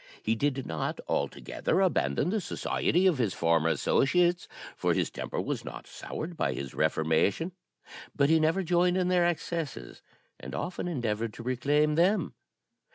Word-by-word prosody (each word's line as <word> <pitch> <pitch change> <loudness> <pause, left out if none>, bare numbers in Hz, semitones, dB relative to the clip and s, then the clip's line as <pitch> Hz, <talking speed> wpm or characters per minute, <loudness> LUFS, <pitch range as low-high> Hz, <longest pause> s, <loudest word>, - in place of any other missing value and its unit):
He 110 - +2
did 135 +2 -1
not 80 -1 -3
altogether - - -1
abandon 70 - +1
the 215 0 0
society 180 +1 0
of 175 -8 +3
his 110 -6 0
former 80 -1 +2
associates, 175 - +2 0.3
for - - +1
his - - 0
temper - - -4
was - - -2
not - - -8
soured 170 +2 -6
by - - 0
his 70 -1 -6
reformation; 80 - +1 0.6
but 140 -1 +3
he 160 +1 +4
never 160 +5 +2
joined 175 +1 +2
in 180 -1 +1
their 175 -1 +3
excesses, 165 - -4 0.4
and - - -7
often 180 0 -3
endeavoured 115 -8 -2
to 115 - -8
reclaim 145 +5 +2
them. 180 +7 +2
150 Hz, 155 wpm, -29 LUFS, 115-175 Hz, 0.6 s, he